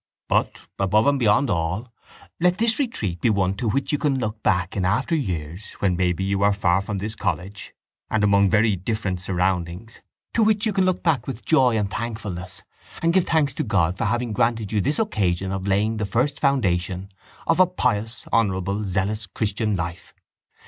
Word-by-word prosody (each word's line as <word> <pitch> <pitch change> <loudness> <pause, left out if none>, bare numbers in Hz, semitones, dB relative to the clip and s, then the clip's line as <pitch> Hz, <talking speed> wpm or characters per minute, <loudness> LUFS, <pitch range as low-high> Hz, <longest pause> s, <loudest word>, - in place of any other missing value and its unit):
But, - - 0 0.2
above 100 +3 +3
and 140 -1 +3
beyond 115 +2 +3
all, 90 +7 -2 0.5
let 180 +1 +3
this 230 +2 +4
retreat 105 - -2
be - - +3
one 95 -3 +1
to 115 +1 -1
which 135 +6 0
you 150 - 0
can 145 -3 +1
look 110 -3 -3
back 90 -2 0
in 95 - -1
after 115 - +1
years 90 - -4
when, 95 -3 0
maybe, 90 0 0
you 100 0 0
are 100 0 +4
far 95 -1 +2
from 100 +1 -4
this 105 +3 -3
college 95 0 -4 0.3
and 110 -1 +1
among 100 -1 +4
very 105 0 +3
different 95 -1 -3
surroundings, 90 +3 -2 0.3
to 230 - +2
which 215 0 +3
you 215 - 0
can 190 -1 +2
look 185 -1 0
back 145 -8 +1
with 125 -4 -6
joy 130 -7 +4
and 100 -2 -1
thankfulness 105 -6 -5 0.4
and 165 0 +3
give 185 -1 +3
thanks 150 -5 +1
to - - -2
God 95 -6 +1
for - - 0
having 120 +2 -1
granted 110 -1 0
you 105 -2 +1
this 145 +9 0
occasion 95 - 0
of 95 0 -3
laying 105 +3 +1
the 105 -1 -2
first 130 +8 0
foundation 95 - 0 0.3
of 165 - +2
a 185 - +7
pious 115 - -1
honourable 100 -2 +1
zealous 100 +2 -2
christian 105 +2 -1
life. 85 0 -5
105 Hz, 190 wpm, -23 LUFS, 95-125 Hz, 0.5 s, a